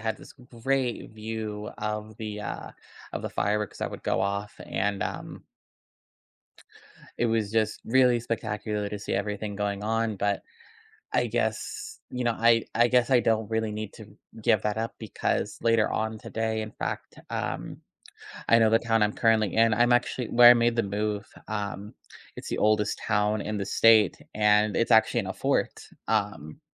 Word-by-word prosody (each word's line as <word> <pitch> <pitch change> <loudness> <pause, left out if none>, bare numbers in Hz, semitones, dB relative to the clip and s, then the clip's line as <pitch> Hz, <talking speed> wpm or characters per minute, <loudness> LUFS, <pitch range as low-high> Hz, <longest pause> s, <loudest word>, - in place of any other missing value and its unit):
had 110 0 -2
this - - -14
great 125 +1 -3
view 110 -1 -5
of 105 0 -4
the, 105 -1 -5
uh 105 - -6 0.4
of - - -4
the - - -4
fireworks 105 -1 -1
that - - -3
would - - -8
go - - 0
off, 100 +1 -2
and, 100 +1 -1
um - - -6 1.8
it 120 - +2
was 110 -3 0
just 110 -1 0
really 125 0 +4
spectacular 105 -2 -3
to 105 - -5
see 100 - -5
everything 105 0 -3
going 100 -1 -2
on, 115 0 0
but. 100 +1 -1 0.7
I - - +3
guess 430 0 -3
you 125 - -3
know, 120 - +2
I 115 0 +4
I 120 +1 +4
guess 125 -1 +3
I 125 - +5
don't 110 -2 +1
really 110 -1 -1
need 105 -1 -6
to 110 - -11 0.4
give 110 - +3
that 105 0 -1
up 115 +1 -2
because 110 -3 -2
later 115 -2 +3
on 110 0 -2
today, 110 0 -2
in 110 0 -5
fact, - - -5
um - - -4 0.7
I 115 - +7
know 110 -1 +5
the 115 +1 +4
town 115 -1 +1
I'm 105 0 +1
currently 110 -3 +2
in 115 0 +4
I'm 120 +2 +4
actually 120 0 0
where 120 0 +8
I - - +9
made 120 0 +2
the 115 - +3
move, 105 +1 -2 0.2
um, 105 -1 -4 0.4
it's - - -8
the - - -2
oldest 105 0 +2
town 105 0 +1
in 105 +1 -3
the 100 - -2
state 110 -3 +5 0.2
and 105 0 +3
it's 115 - +1
actually 110 - +5
in - - -6
a - - -2
fort, - - 0 0.3
um 100 -8 -2
110 Hz, 175 wpm, -27 LUFS, 105-115 Hz, 1.8 s, I